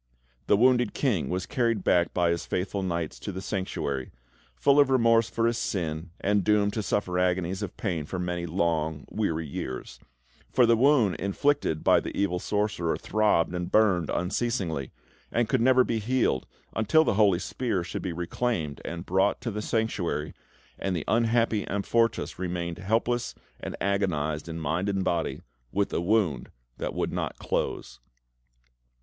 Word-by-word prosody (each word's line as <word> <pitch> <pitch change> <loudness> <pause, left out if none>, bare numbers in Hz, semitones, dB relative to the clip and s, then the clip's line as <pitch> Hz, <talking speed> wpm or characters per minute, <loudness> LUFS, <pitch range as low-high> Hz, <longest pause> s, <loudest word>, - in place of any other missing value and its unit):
The 105 - +5
wounded 125 0 +3
King 100 - 0
was 90 0 -2
carried 115 -7 0
back 85 0 +3
by 85 -1 +2
his 85 - -2
faithful 95 +2 -2
knights 85 -8 -3
to - - -5
the 95 - -5
Sanctuary, 95 -9 -3 0.5
full 140 - +4
of 140 -2 +5
remorse 115 -3 +4
for 115 - 0
his 115 0 +1
sin 80 -3 -3
and 100 0 +1
doomed 105 +1 +2
to 110 - -1
suffer 95 -3 -1
agonies 90 +1 0
of 100 -3 -5
pain 85 -8 -2
for 95 - -4
many 90 -1 -2
long, 80 -3 -1
weary 80 -7 -1
years; 65 -3 -6 0.5
for 125 - +5
the 115 0 +5
wound 120 -6 +4
inflicted 100 - 0
by - - +5
the - - -6
evil 95 -3 +1
sorcerer 105 -4 -1
throbbed 105 -6 +1
and 90 0 -3
burned 95 -7 +3
unceasingly, 90 - -1 0.4
and 120 -1 +1
could 130 0 +1
never 130 +1 +5
be 115 -2 -1
healed 115 - 0 0.3
until 110 +9 +4
the - - +1
holy 100 -3 +4
spear 105 -1 -2
should 85 - -5
be 95 - -3
reclaimed 85 -2 -2
and 85 +1 -6
brought 95 +2 +2
back - - -36
to 115 - -3
the 105 +1 -3
Sanctuary, 90 -10 -1 0.5
and 95 -1 -1
the 80 - -3
unhappy 115 -2 +2
Amfortas 115 +3 0
remained 85 -2 -3
helpless 115 +5 0 0.2
and - - -5
agonised 85 -6 -1
in 80 0 -5
mind 80 +5 -1
and 95 -1 0
body, 85 -3 -1 0.3
with 100 0 0
a - - 0
wound 95 -5 +1 0.3
that - - -3
would - - -1
not - - -3
close. - - -3
95 Hz, 165 wpm, -27 LUFS, 85-115 Hz, 0.5 s, The